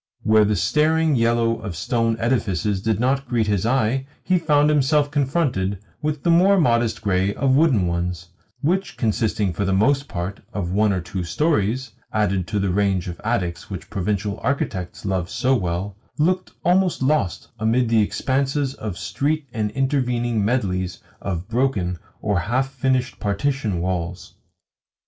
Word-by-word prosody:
Where 110 -1 +5
the 105 +1 +1
staring 155 +4 +2
yellow 115 -1 +2
of 100 -5 -5
stone 115 +7 0
edifices 105 -5 0
did 110 -1 0
not 135 +3 +1
greet 115 -3 +1
his 105 0 0
eye 130 +1 +1 0.2
he 185 -1 +2
found 150 -2 +3
himself 145 0 +2
confronted 135 - 0 0.2
with 150 -1 -2
the 170 - +3
more 190 +4 +5
modest 115 -7 +1
grey 100 0 +1
of 135 -1 +2
wooden 135 - +4
ones; 85 0 -2 0.3
which, 180 +6 0
consisting, 110 -3 0
for 95 - -2
the 95 0 +1
most 135 +7 +2
part, 90 +1 -4
of 90 -4 -3
one 105 +2 +3
or 95 -2 0
two 95 0 -4
storeys 125 - 0 0.2
(added 100 -4 0
to 110 - -2
the 100 -2 0
range 95 -2 +1
of 85 - -7
attics 100 -7 -2
which 95 -2 -7
provincial 100 +1 -2
architects 110 -10 -2
love 95 -3 -1
so 130 +2 +1
well), 95 -1 -2 0.2
looked 185 +4 +1 0.2
almost 180 -4 +2
lost 135 - 0
amid 115 +3 +2
the 115 -1 +4
expanses 135 +5 0
of 105 -8 -6
street 145 +8 -1
and 105 -2 -1
intervening 125 -4 0
medleys 95 -6 -1 0.2
of 90 -2 -3
broken 110 -8 0 0.2
or 105 -4 +1
half 130 +9 0
finished 130 -1 0
partition 105 -1 -1
walls. 90 0 -3
115 Hz, 155 wpm, -22 LUFS, 95-135 Hz, 0.3 s, Where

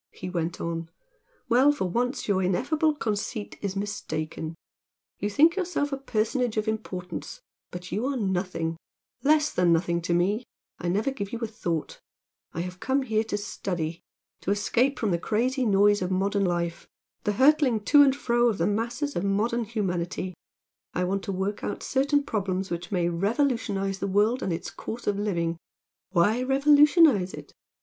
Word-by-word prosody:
he 185 -1 -7
went 170 -1 -2
on 165 0 -3 0.6
"Well 255 +4 +5
for 290 -9 -2
once 245 - -1
your 195 -2 +2
ineffable 295 - +1
conceit 215 -4 -3
is 200 -1 -3
mistaken. 160 -5 -4 0.6
You 205 - -1
think 315 - +5
yourself 355 -6 -1
a 275 - -1
personage 245 -2 -1
of 215 +1 0
importance 210 - -5 0.3
but 180 0 -8
you 220 +6 -1
are 275 -1 -1
nothing, 180 -5 -1 0.4
less 300 +1 +3
than 180 -1 +3
nothing 170 +1 +1
to 170 +1 -1
me, 200 +7 +1 0.4
I 175 - -3
never 210 +9 +1
give 200 -7 -5
you 235 - -3
a - - 0
thought 170 -7 -4 0.5
I 165 - -3
have 180 +1 -6
come 270 +4 +1
here 220 -3 +1
to 210 -2 -2
study 175 -5 -4 0.4
to - - -4
escape 240 +6 +1
from 215 -4 0
the 170 - +1
crazy 250 +6 0
noise 205 0 +4
of 180 - -1
modern 195 +2 +1
life 170 -1 -2 0.4
the 210 - +1
hurtling 265 -2 +4
to 290 +7 +6
and 275 -2 +5
fro 240 -3 +2
of 215 - -1
the 165 - +1
masses 235 +8 -1
of 175 - -1
modern 220 +4 +1
humanity, 185 -4 -2 0.6
I 180 - +1
want 195 +2 0
to - - -2
work 195 +2 -2
out - - -4
certain 285 +2 +2
problems 195 -6 -2
which 170 +2 -4
may 175 -3 +1
revolutionise 195 - 0
the - - -2
world 210 +6 +2
and 190 - -1
its 165 - -4
course 235 +2 -7
of 205 -1 0
living 170 -5 -1 0.3
" - - -66
"Why 205 +6 +3
revolutionise 280 - +5
it?" - - -11
205 Hz, 170 wpm, -26 LUFS, 180-250 Hz, 0.6 s, to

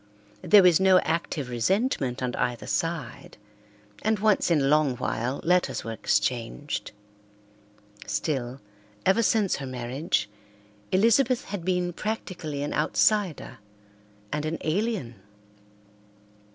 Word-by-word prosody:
There 190 +2 +6
was 180 -2 +6
no 190 -1 +5
active 160 -4 -2
resentment 130 - 0
on 125 -1 -2
either 120 -1 -2
side, 165 -7 -3 0.6
and 220 0 +1
once 210 -2 +2
in 165 -3 +3
a - - 0
long 145 -3 +2
while 125 +4 -2
letters 180 +1 +1
were 115 - -5
exchanged. 110 - -2 1.2
Still, 125 +4 -2 0.5
ever 195 +5 +4
since 210 -3 +2
her 135 - -6
marriage, 125 0 -2 0.6
Elizabeth 230 +5 +3
had 195 -3 -5
been 180 -1 0
practically 170 -8 -4
an 145 - -3
outsider 160 - +1 0.7
and 150 0 -1
an 155 +1 -2
alien. 160 - -2
160 Hz, 110 wpm, -26 LUFS, 130-190 Hz, 1.2 s, There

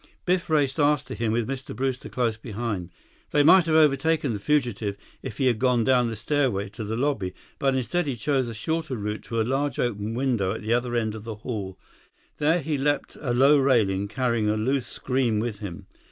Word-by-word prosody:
Biff 180 -1 +1
raced 145 -2 +1
after 145 -1 +2
him, 115 -2 -1
with 115 0 0
Mr. 135 0 -5
Brewster 130 -1 -2
close 120 -3 0
behind. 105 -5 -4 0.4
They 145 - +3
might 170 +3 +6
have 160 - +2
overtaken 150 -2 +3
the 105 - -4
fugitive 115 -6 0 0.2
if 130 -6 -7
he 135 - +1
had 120 -4 +2
gone 125 -2 +3
down 125 -1 +3
the 115 - -4
stairway 110 -4 0
to 110 +3 -7
the 110 +2 -3
lobby, 120 -9 -1 0.2
but 135 -1 +2
instead 130 +7 -1
he 135 - -1
chose 130 +3 0
a 115 - -5
shorter 160 +3 -2
route 105 0 -3
to 115 - -2
a - - +3
large 135 +3 -1
open 110 -2 -2
window 120 -7 0
at - - -7
the 110 +2 +1
other 120 0 0
end 110 -2 0
of 110 -1 -8
the 115 -1 -6
hall. 105 -4 -5 0.6
There, 160 +4 +2
he 150 -1 -2
leaped 145 +1 0
a 135 -5 -1
low 135 +4 +5
railing, 105 -8 +2
carrying 115 -1 0
a 105 - +1
loose 130 +4 0
screen 125 -5 0
with 110 -2 -3
him. 100 -6 -7
125 Hz, 210 wpm, -25 LUFS, 110-140 Hz, 0.6 s, might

